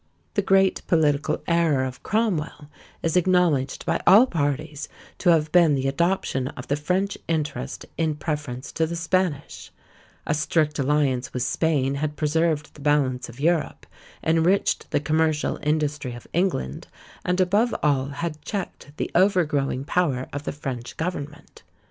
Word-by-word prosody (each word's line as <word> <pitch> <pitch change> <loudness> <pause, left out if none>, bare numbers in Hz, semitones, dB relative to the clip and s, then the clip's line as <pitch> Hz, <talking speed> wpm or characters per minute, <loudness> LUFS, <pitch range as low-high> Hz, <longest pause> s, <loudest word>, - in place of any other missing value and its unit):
The 205 - +2
great 195 0 +3
political 150 -3 +1
error 165 -6 +2
of 130 0 -7
Cromwell 165 -9 -1 0.3
is 165 -1 0
acknowledged 175 -7 +2
by - - 0
all 215 +6 +8
parties 150 - -2 0.3
to 180 - +2
have 155 -2 +3
been 170 -5 +5
the 135 0 -1
adoption 140 -3 0
of 125 -2 -8
the 140 - +2
French 185 +7 -1
interest 150 - -3
in 160 -2 +1
preference 145 -4 -4
to 160 -1 0
the 170 - -4
Spanish; 170 -3 -1 0.6
a - - 0
strict 150 0 0
alliance 135 -2 +1
with 125 - 0
Spain 140 -4 +1
had 150 -1 -2
preserved 155 0 0
the 150 - -14
balance 135 -4 +1
of 120 +3 -12
Europe, 165 +1 0 0.4
enriched 165 +5 +2
the - - +1
commercial 155 0 0
industry 150 -4 -1
of 120 - -11
England, 170 - -1 0.4
and, 180 +1 0
above 205 +6 +2
all, 140 -3 +2
had 155 +2 -5
checked 180 -6 -6
the - - -3
overgrowing 155 -8 +2
power 140 -7 0
of 145 +1 -5
the - - -2
French 130 -4 -6
government. 150 -4 -5
150 Hz, 150 wpm, -24 LUFS, 140-170 Hz, 0.6 s, all